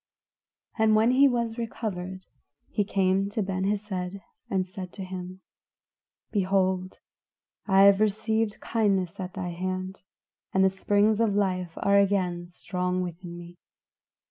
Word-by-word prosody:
And 220 -1 +5
when 220 +3 +4
he 275 +2 +6
was 235 -2 -1
recovered, 190 -5 -4 0.5
he 205 - +1
came 195 0 +1
to 210 +1 -1
Ben 190 0 -2
Hesed 200 -2 -2 0.3
and 190 -1 0
said 185 -1 -8
to 195 - -6
him, 185 0 -7 0.9
"Behold, 190 -2 +1 0.7
I 195 -1 +5
have 200 +1 +6
received 220 +1 0
kindness 195 -6 0
at 185 0 -5
thy 185 -2 -3
hand, 185 +2 -4 0.5
and 190 - +5
the 190 - +4
springs 205 +2 +2
of 215 -3 +2
life 185 -4 0
are 200 0 +5
again 185 -3 +1
strong 180 +1 -2
within 175 0 -7
me. 175 0 -11
190 Hz, 135 wpm, -27 LUFS, 185-205 Hz, 0.9 s, he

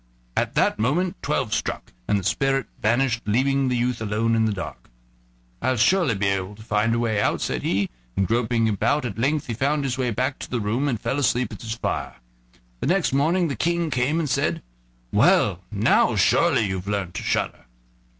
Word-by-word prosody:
At - - -1
that - - +2
moment 170 - +1
twelve 135 -6 -1
struck, - - -3
and 105 - +2
the 100 - -3
spirit 135 +6 +1 0.2
vanished, 115 +1 +1
leaving 135 +5 +2
the 125 -1 0
youth 120 -1 -1
alone 110 +2 0
in 110 0 +2
the 110 - +1
dark. 95 -3 -7 0.7
"I'll 130 -1 +1
surely 170 - +3
be 100 +1 -1
able 95 +1 -2
to 110 - -13
find 110 +1 +1
a - - 0
way 110 -3 0
out," - - +1
said - - -2
he, 100 +1 0 0.3
and 95 - +2
groping 115 0 +1
about 115 +8 +1
he 120 - -2
at 105 - -10
length 135 -2 0
found 145 +2 +1
his 130 -1 -2
way 125 -2 +1
back 130 +4 -1
to - - -7
the 120 - -1
room, 115 +7 0
and 120 -6 -1
fell 115 +5 -1
asleep 125 -3 +1
at 105 - -10
his 115 0 -4
fire. 115 - -3 0.6
The - - -2
next 180 -6 +2
morning 165 +6 +2
the 140 - -3
King 170 +5 0
came, 130 +5 +1
and 160 - -1
said: - - 0 0.5
"Well, - - +4
now - - +3
you've - - -1
surely 100 -4 +3
learned 95 -1 -3
to - - -4
shudder?" - - -2
120 Hz, 200 wpm, -23 LUFS, 110-135 Hz, 0.7 s, Well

